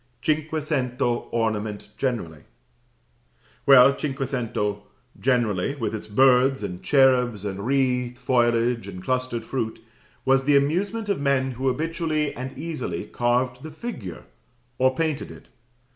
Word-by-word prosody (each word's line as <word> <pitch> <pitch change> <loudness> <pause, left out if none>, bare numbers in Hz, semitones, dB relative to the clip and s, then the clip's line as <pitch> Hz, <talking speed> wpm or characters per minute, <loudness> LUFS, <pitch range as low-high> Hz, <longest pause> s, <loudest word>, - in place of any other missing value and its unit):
Cinquecento 150 -5 -1
ornament 110 -3 -2
generally. 105 - -3 1.3
Well, 135 0 +8
cinquecento 125 -7 -2 0.4
generally, 120 -2 +1
with 115 -5 -3
its 110 -1 -5
birds, 130 +2 +4
and 90 -3 -5
cherubs, 125 -6 +3
and 100 +2 -4
wreathed 125 -2 +1
foliage, 120 -3 +1
and 90 -2 -8
clustered 125 -1 -1
fruit, 115 -4 -3 0.5
was 135 0 +3
the 145 0 +5
amusement 190 +10 0
of 200 -8 -1
men 135 -2 +1
who 130 +2 -3
habitually 155 +2 -1
and 130 +2 -6
easily 135 - -4
carved 125 +3 0
the 155 - -7
figure, 155 - -7 0.6
or 130 0 +3
painted 155 -2 -1
it. - - -13
130 Hz, 120 wpm, -24 LUFS, 115-140 Hz, 1.3 s, Well